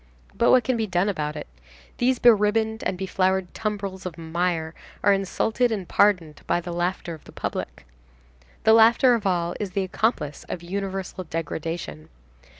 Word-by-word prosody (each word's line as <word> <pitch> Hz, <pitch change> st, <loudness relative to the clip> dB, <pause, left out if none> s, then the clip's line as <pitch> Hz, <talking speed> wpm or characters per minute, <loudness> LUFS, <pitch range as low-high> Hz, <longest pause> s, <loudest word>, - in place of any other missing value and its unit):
But -, -, +2 dB
what 255 Hz, -1 st, +6 dB
can 255 Hz, +1 st, 0 dB
be 220 Hz, -1 st, -1 dB
done 180 Hz, +2 st, +1 dB
about 150 Hz, -5 st, -2 dB
it? 150 Hz, -, -6 dB, 0.5 s
These 255 Hz, +1 st, +2 dB
be 240 Hz, -, +7 dB
ribboned 220 Hz, +1 st, +1 dB
and 185 Hz, -, -1 dB
be 190 Hz, -, -3 dB
flowered 190 Hz, -1 st, 0 dB
tumbrils 200 Hz, -3 st, -4 dB
of 170 Hz, -, -8 dB
mire 165 Hz, 0 st, -2 dB, 0.3 s
are 205 Hz, -, +5 dB
insulted 220 Hz, +5 st, 0 dB
and 195 Hz, -5 st, -3 dB
pardoned 180 Hz, -7 st, +2 dB
by -, -, +2 dB
the 175 Hz, 0 st, -6 dB
laughter 175 Hz, 0 st, -2 dB
of 155 Hz, -, -12 dB
the -, -, -13 dB
public. -, -, -5 dB, 0.8 s
The 220 Hz, -, +6 dB
laughter 230 Hz, +3 st, +6 dB
of 225 Hz, -4 st, 0 dB
all 175 Hz, -2 st, 0 dB
is 200 Hz, -3 st, -4 dB
the 195 Hz, -, 0 dB
accomplice 185 Hz, -, -1 dB
of 175 Hz, -, -5 dB
universal 190 Hz, 0 st, -4 dB
degradation. 160 Hz, -, -5 dB
190 Hz, 170 wpm, -24 LUFS, 170-215 Hz, 0.8 s, be